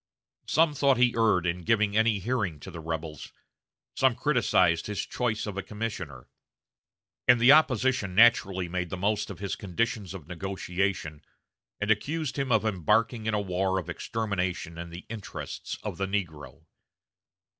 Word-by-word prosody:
Some 160 -1 +3
thought 140 -2 +3
he 125 -1 +4
erred 110 -6 +3
in 90 +1 -1
giving 105 +1 +1
any 110 -1 +3
hearing 100 -6 -2
to 95 - -9
the 85 - -8
rebels; 80 -2 -5 0.6
some 130 -3 +3
criticized 105 - +2
his 105 -2 -3
choice 115 -3 -2
of 105 -2 -5
a - - -1
commissioner; 95 - -6 1.0
and 125 -1 +6
the 120 +3 +7
opposition 130 -9 +3
naturally 100 -5 +4
made 90 0 -3
the 95 - -4
most 105 +3 0
of 100 - -7
his 100 +1 -3
conditions 100 0 -2
of 80 -7 -10
negotiation, 90 -3 -3 0.6
and 105 +1 +1
accused 145 +6 -1
him 135 -2 -1
of 110 -1 +3
embarking 110 +4 +1
in 110 - +1
a - - +1
war 95 0 0
of 90 - -4
extermination 95 -6 -3
in 85 0 -6
the 85 +1 -9
interests 110 -3 -6
of - - -5
the 95 - 0
negro. 80 -6 -4
100 Hz, 155 wpm, -28 LUFS, 90-115 Hz, 1.0 s, the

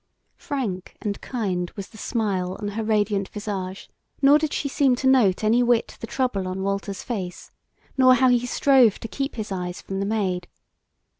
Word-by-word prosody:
Frank 215 -10 -4
and 205 -1 -4
kind 185 -8 -2
was 200 -2 -7
the 220 - -15
smile 190 -6 -1
on 205 -1 -3
her 220 +2 -3
radiant 210 -2 +1
visage, 195 -3 -5 0.3
nor 285 +2 +6
did 310 -1 -1
she 285 - -1
seem 270 -2 +2
to 260 - -5
note 240 -8 +4
any 225 +3 +4
whit 240 -1 +1
the 230 - -6
trouble 225 -9 -1
on 185 +1 -3
Walter's 200 0 -3
face, 190 -8 -5 0.5
nor 255 -1 +7
how 260 +1 +4
he 245 -1 +3
strove 255 -4 +4
to - - -5
keep 275 +4 -4
his 215 -3 -5
eyes 180 -1 -4
from 195 0 -5
the 195 - -1
Maid. 190 -5 -1
215 Hz, 180 wpm, -24 LUFS, 190-250 Hz, 0.5 s, nor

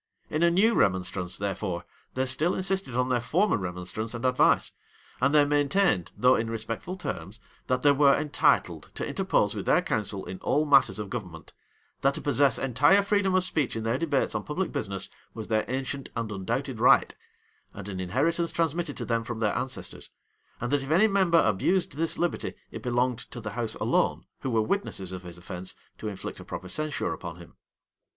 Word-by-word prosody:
In 155 - 0
a 170 - +6
new 200 +7 +4
remonstrance, 90 - 0
therefore, 95 -3 -3 0.3
they 130 0 +1
still 155 +7 +1
insisted 190 -8 -1
on 125 +1 +1
their 125 -2 +1
former 185 - +2
remonstrance 90 +4 -4
and 120 +2 -4
advice; 125 0 +3 0.5
and 140 +2 +4
they 145 -1 +6
maintained, 145 - +2
though 125 +1 +5
in 115 -2 0
respectful 115 +10 -4
terms, 100 - -6 0.3
that 125 0 0
they 145 - +7
were 140 0 +5
entitled 150 -1 +1
to - - -3
interpose - - +1
with - - -5
their - - +4
counsel 100 -3 -2
in 95 - -7
all 150 +2 +1
matters 135 -5 +5
of 105 -2 -5
government; 90 -9 -7 0.5
that 135 +1 +2
to - - -3
possess 140 -3 +3
entire 145 - +4
freedom 200 -2 +2
of 185 - +4
speech 150 -9 0
in 115 - -3
their 115 +3 0
debates 145 -5 0
on 110 - -1
public 180 +5 -2
business, 100 -2 -3 0.3
was 110 -2 -6
their 110 -1 +1
ancient 135 +1 -3
and 115 -2 -3
undoubted 115 +6 -3
right, 125 - +5 0.6
and - - -7
an 95 -2 -5
inheritance 165 - 0
transmitted 165 -2 -1
to - - -4
them 115 -1 0
from 115 0 -5
their 105 -2 +1
ancestors; 130 +1 -4 0.5
and 120 - -3
that 145 -1 +2
if 135 - -7
any 175 +7 +5
member 190 -5 +4
abused 115 - +1
this 160 +4 -1
liberty, 175 0 -1 0.2
it - - -7
belonged 125 0 0
to 125 - -8
the 110 -2 -5
house 115 0 -2
alone, - - +1
who 135 - -3
were 115 -3 +2
witnesses 110 - -2
of 90 -1 -6
his 90 -1 -9
offence, 90 +1 -7 0.2
to 110 - -5
inflict 100 -3 -6
a - - -9
proper 95 - -7
censure 155 +6 -2
upon 85 -2 -7
him. 85 -1 -14
125 Hz, 190 wpm, -27 LUFS, 105-150 Hz, 0.6 s, they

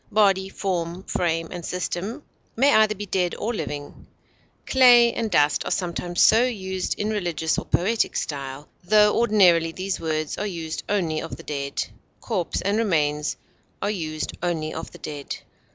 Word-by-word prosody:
Body, 195 -2 +3
form, 180 -2 -3
frame, 165 -3 -1
and 175 -2 -6
system 185 - -3 0.3
may 275 +5 +4
be - - +3
either 215 -1 +4
dead 190 -3 -1
or 230 +3 -2
living; 145 -8 -6 0.6
clay 245 -3 +6
and 230 -2 -2
dust 150 -6 +3
are - - -4
sometimes 175 -1 -2
so 225 +2 +6
used 190 -7 -2
in 210 +1 0
religious 175 -6 -1
or - - -8
poetic 215 +6 +1
style, 140 0 -4 0.2
tho 210 +2 +5
ordinarily 185 -8 +4
these 185 +3 -3
words 155 -2 -2
are 210 - -1
used 165 -4 -4
only 170 -6 0
of - - -6
the - - -11
dead. 140 -1 -3 0.3
Corpse 190 -8 -2
and 200 +3 0
remains 150 -8 0 0.4
are 205 - -1
used 155 -6 -4
only 165 -3 -2
of 160 - -6
the - - -13
dead. 145 -2 -6
180 Hz, 160 wpm, -24 LUFS, 160-210 Hz, 0.6 s, clay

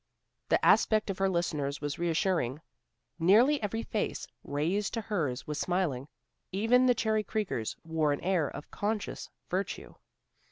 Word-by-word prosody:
The - - +3
aspect 215 -2 +4
of 190 - -7
her 195 0 +3
listeners 150 -6 -1
was 145 +1 -4
reassuring. 165 - 0 0.6
Nearly 230 - +5
every 225 +2 -2
face 215 - -2 0.2
raised 175 +10 -1
to 225 - -1
hers 160 - -2
was 150 0 -4
smiling. 170 -8 -1 0.4
Even 230 +6 +4
the 250 - +5
Cherry 220 -1 +1
Creekers 200 - -2
wore 160 -2 +1
an 145 - -1
air 180 -5 +1
of 145 - -9
conscious 210 0 -3 0.2
virtue. 190 +2 -3
185 Hz, 145 wpm, -30 LUFS, 150-215 Hz, 0.6 s, Nearly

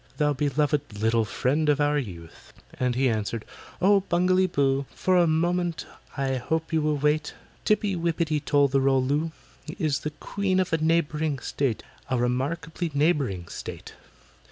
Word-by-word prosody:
Thou 150 -1 +2
beloved 145 -4 -1
little 115 +1 +2
friend 140 +9 0
of 145 -1 +3
our 145 0 +2
youth!" 85 - -9 0.3
And 125 -1 +1
he 130 +1 +2
answered, 110 -1 -2 0.3
"Oh, 200 +2 +5
BUNGALEE 185 +2 +3
BOO, 140 -4 +1
For 185 - +1
a 175 -1 +5
moment 170 +1 0 0.3
I 135 -1 0
hope 160 +6 -2
you 160 - +3
will 150 -1 +1
wait,— 150 +1 0 0.3
TIPPY 210 -2 +2
WIPPITY 165 -2 0
TOL 145 -1 +3
THE 135 0 +1
ROL 135 -1 +3
LOO 150 +4 0 0.5
Is 150 -4 0
the 150 - -3
Queen 190 +5 -1
of 185 -3 -1
a - - +4
neighbouring 155 -2 +1
state— 130 -1 -2 0.3
A 130 - +1
remarkably 150 +8 -1
neighbouring 140 - +1
state. - - -8
150 Hz, 155 wpm, -26 LUFS, 135-165 Hz, 0.5 s, Oh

